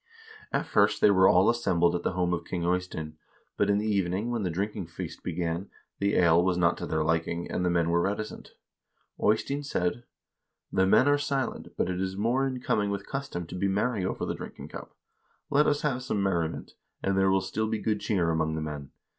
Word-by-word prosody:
At - - 0
first - - +3
they 105 - +6
were 95 -1 +6
all 90 +2 +5
assembled 85 -8 +2
at 90 - -1
the - - -1
home 90 -1 0
of 85 -1 -2
King 85 0 -4
Eystein; 85 -4 -2 0.4
but 100 - +1
in 100 - +3
the 105 - -1
evening 100 +2 0
when 120 -2 -1
the 95 - -1
drinking 95 +1 -3
feast 85 0 -7
began, 85 +2 -3 0.3
the 100 +1 +1
ale 85 -1 +5
was 90 -1 +1
not 85 0 +3
to - - -4
their 80 0 0
liking, 80 +1 -1
and 90 - -1
the 90 - +2
men 85 -1 +1
were 85 0 +3
reticent. 105 +3 -4 0.7
Eystein 135 +7 +1
said: 120 -5 -2 0.7
'The 95 0 +3
men 130 +7 +5
are 145 0 +4
silent, 140 -3 -2
but - - +1
it 90 0 -2
is 95 0 -3
more 120 +6 +1
in 130 -1 -4
keeping 105 -4 +1
with 100 0 -3
custom 135 -11 -4
to 85 - -10
be 90 +2 0
merry 100 +2 0
over 95 - -2
the - - -2
drinking - - -9
cup. - - -9 0.6
Let 150 +2 +4
us 145 0 +1
have 135 -4 0
some 105 -5 -1
merriment, 85 -4 -1 0.3
and 95 0 +1
there 95 0 +3
will 95 0 +4
still 110 +4 -2
be 110 0 -1
good 105 -1 -1
cheer 90 -6 +1
among 80 -1 0
the 80 - -2
men. 75 -3 -5
95 Hz, 215 wpm, -28 LUFS, 85-110 Hz, 0.7 s, they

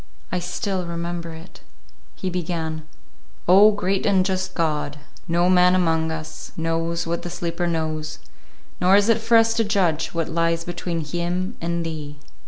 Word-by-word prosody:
I 180 - 0
still 180 +1 -3
remember 170 0 -4
it. 160 - -13 0.5
He 185 - -3
began, 160 -3 -3 0.6
"Oh, 195 +4 +8
great 195 -2 0
and 190 -2 +3
just 185 -1 -2
God, 150 -3 -1 0.3
no 170 +1 +2
man 180 0 +5
among 160 -3 +2
us 160 -1 -7
knows 165 +1 -1
what 170 +1 -2
the 175 - -5
sleeper 175 0 -2
knows, 155 -1 -2 0.6
nor 185 +2 +5
is 205 +2 +4
it 230 -1 +3
for 230 +1 +5
us 225 0 +4
to 230 0 +2
judge 180 -7 +1
what 165 -1 -2
lies 165 0 0
between 175 -1 -3
him 175 +4 -2
and 170 0 -1
Thee." 150 -2 -6
170 Hz, 160 wpm, -23 LUFS, 165-185 Hz, 0.6 s, Oh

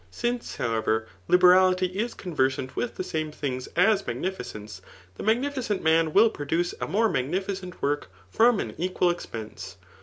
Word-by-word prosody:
Since, 240 - -3
however, 110 -1 0 0.2
liberality 185 +1 +5
is 205 +6 -3
conversant 130 -7 -1
with 245 - -2
the - - -3
same 155 -3 -3
things 130 -4 -4
as 200 +3 +4
magnifi 190 -1 -3
cence, 105 -5 -9 0.3
the - - -10
magnificent 240 -1 0
man 160 0 +3
wiH 220 +6 +5
produce 165 +4 -1
a - - -1
more 225 +3 +2
magnifi 185 +7 -1
cent 185 -1 -10
work 145 -4 -1 0.2
from 230 -1 +4
an - - -4
equal 180 0 +1
expense. 110 - -7
180 Hz, 155 wpm, -26 LUFS, 130-200 Hz, 0.3 s, liberality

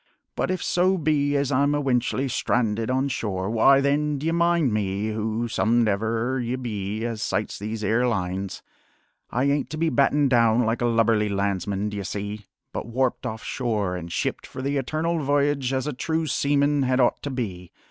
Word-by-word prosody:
But - - -1
if 185 0 -1
so 185 +2 +2
be 145 -3 +1
as 140 0 0
I'm 140 +2 +2
ewentually 135 -1 0
stranded 115 -3 0
on 130 +2 +1
shore, 100 -7 -2
why 135 +5 +5
then, 145 +1 +1
d'ye 155 +4 -1
mind 170 -6 +2
me, 100 0 -1
who 110 +2 -2
somedever 115 +3 +1
ye 120 +2 -2
be 110 -3 -4
as 115 -2 -3
sights - - -2
these 110 +1 -4
'ere 120 +4 +2
lines, 95 -3 -3 0.7
I 125 - 0
ain't 140 0 +1
to 155 - -5
be 165 +1 +1
battened 140 +1 +2
down 115 -1 +4
like 115 +2 -1
a - - +2
lubberly 115 -2 +2
landsman, 100 0 -1
d'ye 105 -1 -4
see, 100 +2 -5 0.3
but - - -4
warped 125 +2 -1
off 110 0 -6
shore 105 -7 -1
an' 85 -2 -6
shipped 85 - -3
for 130 - -7
the 140 +1 0
Eternal 155 +5 -1
V'yage 140 -2 +1
as 130 0 -1
a 150 - -2
true 160 +5 -1
seaman 145 -1 +2
had 130 -1 +1
ought 125 - +2
to 145 - -4
be. 95 -10 -5
120 Hz, 180 wpm, -24 LUFS, 105-140 Hz, 0.7 s, why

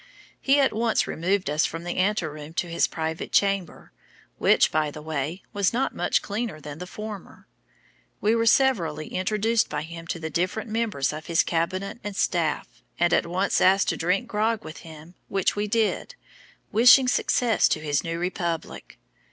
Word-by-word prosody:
He 280 +1 +4
at 270 -4 +3
once 225 +1 +1
removed 185 +4 -1
us 150 +2 +1
from 165 +1 -7
the 175 - -4
ante 195 -1 +1
room 150 0 -8
to - - 0
his 170 0 +1
private 160 0 -4
chamber, 195 -3 0 0.5
which, - - +4
by 155 -1 +1
the 150 - -9
way, 155 +3 -4
was 200 0 +1
not 260 +3 0
much - - 0
cleaner 210 -5 -4
than 150 0 -9
the 180 - -7
former. 210 0 -9 0.7
We 215 +2 +2
were 230 0 +1
severally 175 - +2
introduced 215 +4 0
by - - -3
him 165 +1 -9
to 170 - -3
the 160 0 -5
different 185 +5 -2
members 215 -12 -1
of 155 +1 -8
his 165 -1 +3
cabinet 185 +6 -2
and 205 -1 -5
staff, 170 -5 -1 0.2
and 175 0 +3
at - - +2
once 185 +3 0
asked 195 +1 +4
to - - 0
drink 180 +8 0
grog 220 0 0
with 155 - -8
him, 160 +1 -12
which 195 -1 0
we 205 0 -1
did, 225 - 0 0.6
wishing 245 +4 +7
success 245 -2 +2
to - - 0
his 145 -2 -1
new 165 0 -3
republic. 175 -2 -4
185 Hz, 175 wpm, -25 LUFS, 160-215 Hz, 0.7 s, wishing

